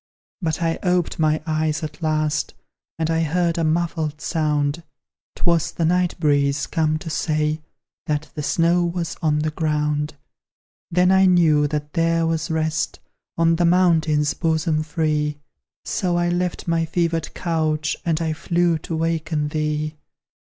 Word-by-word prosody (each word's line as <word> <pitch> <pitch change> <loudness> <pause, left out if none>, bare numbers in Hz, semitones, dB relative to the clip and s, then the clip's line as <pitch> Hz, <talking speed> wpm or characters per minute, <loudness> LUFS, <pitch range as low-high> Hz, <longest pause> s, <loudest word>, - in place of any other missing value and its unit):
But 160 -1 -1
I 165 0 0
oped 180 -3 0
my 155 0 +2
eyes 155 -1 -1
at 155 +2 -6
last, 155 -1 0 0.4
And 160 0 0
I 165 0 +1
heard 170 +1 +1
a - - +1
muffled 155 -2 -1
sound; 150 -1 0 0.5
'Twas 170 -2 +1
the 165 - -1
night 180 +1 +1
breeze, 145 -2 +2
come 155 -1 0
to 160 - -7
say 155 0 0 0.5
That 150 0 -2
the 150 - -4
snow 170 +4 +2
was 170 -1 -2
on 155 -3 +2
the 155 +1 0
ground. 150 -1 -1 0.7
Then 180 +2 +3
I 190 0 +5
knew 160 -5 +4
that 150 0 -4
there 165 -1 +2
was 165 +1 -1
rest 160 -1 -1 0.4
On 165 0 +3
the 175 - +2
mountain's 165 -4 +3
bosom 160 -1 0
free; 150 -1 -1 0.5
So 180 -2 0
I 175 0 +1
left 175 0 -2
my 165 -1 +2
fevered 165 -1 -1
couch, 155 -3 0
And 165 -2 0
I 160 -1 -1
flew 170 +2 +1
to 165 - -5
waken 160 -2 -1
thee! 155 0 -2
160 Hz, 150 wpm, -22 LUFS, 150-170 Hz, 0.7 s, I